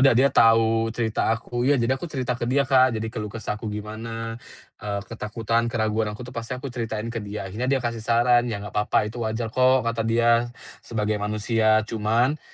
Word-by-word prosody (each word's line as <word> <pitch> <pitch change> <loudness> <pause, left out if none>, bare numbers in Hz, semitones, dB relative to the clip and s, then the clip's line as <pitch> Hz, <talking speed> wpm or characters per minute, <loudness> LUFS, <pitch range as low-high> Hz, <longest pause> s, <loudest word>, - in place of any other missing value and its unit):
udah 135 0 +6
dia 140 +2 +4
tahu 115 0 +4
cerita 115 -1 -1
aku, 115 +2 -2
ya 145 - +5
jadi 120 0 +1
aku 175 - -5
cerita 130 -5 -2
ke 120 - -1
dia, 140 +2 +3
Kak, 130 -3 +4
jadi 110 - -3
keluh 105 -3 -4
kesahku 110 0 -5
gimana, 115 +2 -6 0.4
eee, 100 -1 -3
ketakutan, 115 +1 -2
keraguan 110 -1 0
aku 105 +4 -7
tuh 125 - -10
pasti 115 +1 -4
aku 130 0 -7
ceritain 115 -2 -4
ke 115 - -3
dia. 105 -1 -6
Akhirnya 110 +7 -3
dia 135 -2 +1
kasih 115 -1 -2
saran, 120 +2 +3
"Ya 100 -3 -4
gak 105 - -8
papa, 105 0 +1
itu 110 +3 -6
wajar 110 0 -2
kok," 130 -1 +4
kata 115 0 -1
dia. 115 +1 +3 0.3
"Sebagai 105 -2 -2
manusia, 110 +1 +2
cuman 115 +6 0
115 Hz, 195 wpm, -24 LUFS, 110-120 Hz, 0.4 s, udah